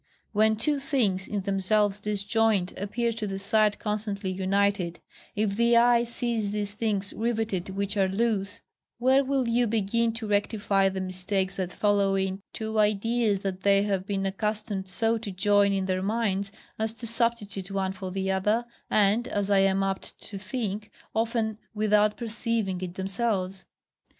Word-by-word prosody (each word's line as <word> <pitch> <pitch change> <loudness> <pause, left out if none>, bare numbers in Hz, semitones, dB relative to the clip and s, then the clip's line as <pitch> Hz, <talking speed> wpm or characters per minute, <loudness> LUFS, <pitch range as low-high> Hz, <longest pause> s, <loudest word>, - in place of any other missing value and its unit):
When 220 +1 +3
two 280 +6 0
things, 230 -10 0
in 205 -1 -2
themselves 200 +1 +1
disjoined, 210 -1 +1
appear 230 +4 -1
to 220 -2 -4
the 195 -1 -3
sight 210 +1 +2
constantly 210 -2 -3
united; 190 -1 0 0.4
if 205 -1 0
the 235 +1 +4
eye 240 0 +5
sees 235 -3 -1
these 205 0 -3
things 205 -2 -1
riveted 220 -5 -1
which 200 +2 -3
are 195 -1 +3
loose, 205 0 -1 0.4
where 260 +3 +4
will 265 -2 0
you 235 +1 +2
begin 225 +2 +1
to 225 0 -5
rectify 205 -1 +1
the 190 0 -4
mistakes 185 +1 -2
that 185 -2 -2
follow 200 -1 +2
in 190 0 -1
two 220 0 -3
ideas 210 0 +2
that 190 -2 -3
they 200 0 +4
have 195 -2 -1
been 195 -1 -1
accustomed 205 0 -2
so 225 +4 +1
to 220 -2 -6
join 200 +1 +3
in 195 -1 0
their 185 0 0
minds 200 -1 -1 0.3
as 220 0 -1
to 230 +1 -8
substitute 220 -5 0
one 190 -1 -1
for 190 -1 -6
the 190 +1 -1
other, 210 +5 +1 0.2
and, 215 +4 +3
as 205 -4 -1
I 200 - +5
am 195 0 +3
apt 195 0 -4
to 200 -3 -6
think, 210 0 -4 0.2
often 225 -1 0 0.2
without 210 0 +3
perceiving 225 -5 -2
it 180 -1 -5
themselves? 195 -1 -1
205 Hz, 160 wpm, -27 LUFS, 195-225 Hz, 0.4 s, eye